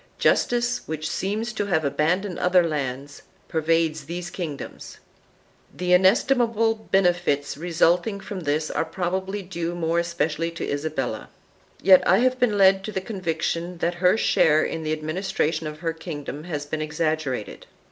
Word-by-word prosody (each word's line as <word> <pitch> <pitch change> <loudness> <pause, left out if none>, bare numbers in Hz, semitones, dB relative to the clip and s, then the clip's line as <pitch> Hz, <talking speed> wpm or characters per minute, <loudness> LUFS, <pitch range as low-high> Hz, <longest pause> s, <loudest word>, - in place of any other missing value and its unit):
Justice, 245 0 +2
which 155 0 -3
seems 215 +4 -2
to 205 -2 -2
have 160 -5 +1
abandoned 170 +7 0
other 180 -1 +4
lands, 140 -2 -4 0.3
pervades 160 -1 0
these 175 +2 -5
kingdoms/'3 160 -7 -7 0.8
The 180 0 +1
inestimable 225 +4 +3 0.2
benefits 175 -7 +1
resulting 175 +5 +1
from 195 0 -6
this 155 -1 -1
are - - 0
probably 190 +4 -3
due 170 -2 -4
more 170 0 0
especially 165 -1 -1
to 170 - -4
Isabella. 145 -6 -3 0.5
Yet 185 0 +8
I 190 - +6
have 255 +2 +2
been 220 -5 +2
led 195 0 +5
to 215 - -4
the 190 - -2
conviction 175 -3 -3
that 170 +1 0
her 185 +3 +5
share 155 -7 +3
in 165 - -3
the 155 -1 -3
administration 155 0 -1
of 155 +1 -8
her 165 -1 -1
kingdom 155 -2 -7
has 150 -4 -4
been 155 +1 -4
exaggerated. 155 -6 -2
170 Hz, 145 wpm, -24 LUFS, 155-190 Hz, 0.8 s, Yet